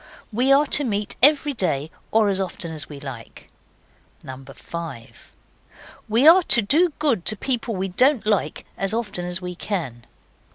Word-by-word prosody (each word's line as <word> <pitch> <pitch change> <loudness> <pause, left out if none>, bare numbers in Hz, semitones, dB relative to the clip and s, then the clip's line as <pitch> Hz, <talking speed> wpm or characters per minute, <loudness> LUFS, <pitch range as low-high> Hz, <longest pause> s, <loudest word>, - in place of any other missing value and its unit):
We 250 +5 +1
are 280 +2 +5
to 290 - +4
meet 210 -4 -2
every 290 +1 +4
day, 160 - -2 0.2
or 220 -1 +2
as 195 -1 +1
often 175 -2 -4
as 150 -3 -1
we 145 -2 -10
like. 130 -5 -11 0.7
5. 135 +1 -10 0.8
We 235 +7 +3
are 350 +4 +8
to 240 -8 +4
do 320 - +2
good 275 - 0
to 215 - +1
people 240 -1 -3
we 190 +1 -3
don't 255 +5 +2
like 210 -2 -1
as 195 +3 -1
often 205 -6 -4
as 180 +1 -2
we 180 0 -5
can. 160 - -5
200 Hz, 160 wpm, -22 LUFS, 170-255 Hz, 0.8 s, are